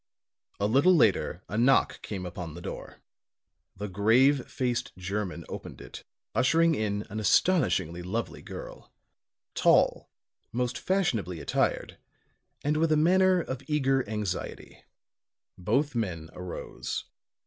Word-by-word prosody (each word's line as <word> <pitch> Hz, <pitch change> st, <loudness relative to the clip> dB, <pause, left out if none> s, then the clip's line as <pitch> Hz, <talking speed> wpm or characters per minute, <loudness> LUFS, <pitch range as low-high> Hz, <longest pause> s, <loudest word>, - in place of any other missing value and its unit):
A 100 Hz, -, +1 dB
little 140 Hz, -, +5 dB
later 110 Hz, -, +2 dB
a 105 Hz, -, -2 dB
knock 130 Hz, +3 st, +3 dB
came 95 Hz, -3 st, -5 dB
upon 90 Hz, -3 st, -6 dB
the 85 Hz, -, -8 dB
door. -, -, -8 dB, 0.7 s
The 105 Hz, +2 st, -4 dB
grave 120 Hz, +8 st, +3 dB
faced 125 Hz, -7 st, -2 dB
German 95 Hz, -2 st, -4 dB
opened -, -, -8 dB
it, -, -, -10 dB, 0.3 s
ushering 165 Hz, +5 st, +3 dB
in 105 Hz, -5 st, -1 dB
an 110 Hz, -, -3 dB
astonishingly 95 Hz, -, +2 dB
lovely 105 Hz, +6 st, -4 dB
girl; -, -, -9 dB, 0.6 s
tall, -, -, +3 dB, 0.4 s
most 125 Hz, +1 st, -2 dB
fashionably 120 Hz, -, 0 dB
attired -, -, -1 dB, 0.6 s
and 150 Hz, +1 st, +1 dB
with 160 Hz, 0 st, +2 dB
a 155 Hz, -, +4 dB
manner 185 Hz, +3 st, +4 dB
of 130 Hz, -4 st, -5 dB
eager 135 Hz, -3 st, +2 dB
anxiety. 105 Hz, -4 st, -5 dB, 0.7 s
Both 135 Hz, +11 st, 0 dB
men 85 Hz, -9 st, -3 dB
arose. 90 Hz, -1 st, -5 dB
115 Hz, 120 wpm, -28 LUFS, 95-145 Hz, 0.7 s, little